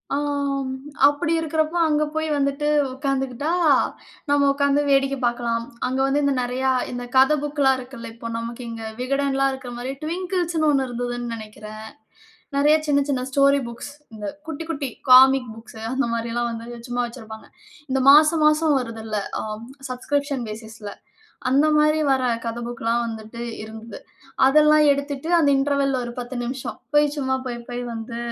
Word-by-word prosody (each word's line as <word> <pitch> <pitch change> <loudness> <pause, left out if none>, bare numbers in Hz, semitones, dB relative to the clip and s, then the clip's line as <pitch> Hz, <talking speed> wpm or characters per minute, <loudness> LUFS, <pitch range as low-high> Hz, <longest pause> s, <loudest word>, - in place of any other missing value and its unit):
ஆம். 280 -2 -1 0.3
அப்பிடி 295 +3 0
இருக்கிறப்ப 315 +1 -1
அங்க 300 0 +2
போய் 315 0 0
வந்துட்டு 280 +1 0 0.3
உட்கார்ந்துக்கிட்டா, 270 +2 -2 0.8
நம்ம 285 -1 +4
உட்கார்ந்து 280 +1 +2
வேடிக்கை 275 0 +2
பார்க்கலாம். 235 -1 -1 0.2
அங்க 260 +1 -2
வந்து 280 +2 +1
இந்த 280 0 +2
நிறையா 255 +2 0 0.2
இந்த 245 0 -5
கத 270 +4 +5
புக்லாம் 285 -3 +2
இருக்குல்ல. 250 -2 -9
இப்ப 230 0 -7
நமக்கு 235 +2 -6
இங்கு 225 -1 -6
விகடன்லாம் 275 +1 +1
இருக்கிறமாரி 250 0 -6
ட்விங்கிள்ஸ்ன்னு 345 -1 -1
ஒண்ணு 270 -2 +2
இருந்ததுன்னு 245 -1 -4
நினைக்கிறேன். 215 0 -9 0.7
நிறைய 295 +2 +5
சின்ன, 285 -1 +3
சின்ன 265 -3 0
ஸ்டோரி 280 0 +4
புக்ஸ். 235 +4 -8 0.2
இந்த 210 -1 -7 0.2
குட்டி, 320 0 -5
குட்டி 285 -4 -3 0.2
காமிக் 260 -1 +7
புக்ஸ் 225 0 -12
அந்தமாரி 235 -3 -1
எல்லாம் 240 0 0
வந்து 230 +1 -7
சும்மா 245 0 -1
வச்சிருப்பாங்க. 225 -2 -10 0.4
இந்த 265 0 +1
மாசம், 305 +2 +6
மாசம் 305 0 +4
வருதுல்ல. 225 -3 -5 0.2
ஆம், 215 +1 -6 0.2
சப்ஸ்கிரிப்ஷன் 280 +1 -2
ஃபேசிஸ்ல. 220 -1 -8 0.6
அந்தமாரி 300 +3 +3
வர்ற 260 -1 +2 0.2
கத 230 +1 -3
புக்லாம் 235 0 -1
வந்துட்டு 225 +1 -7 0.2
இருந்தது. 220 +1 -9 0.5
அதெல்லாம் 300 +2 +5
எடுத்துட்டு 280 +2 -3
அந்த 305 -4 +4
இன்டர்வல்ல 275 -1 +1
ஒரு 240 - -5
10 245 +1 -6
நிமிஷம். 255 +2 -5 0.2
போய் 295 0 +5
சும்மா 265 -2 0
போய், 245 -2 -4
போய் 245 0 -4
வந்து 230 +1 -6
265 Hz, 145 wpm, -23 LUFS, 235-285 Hz, 0.8 s, காமிக்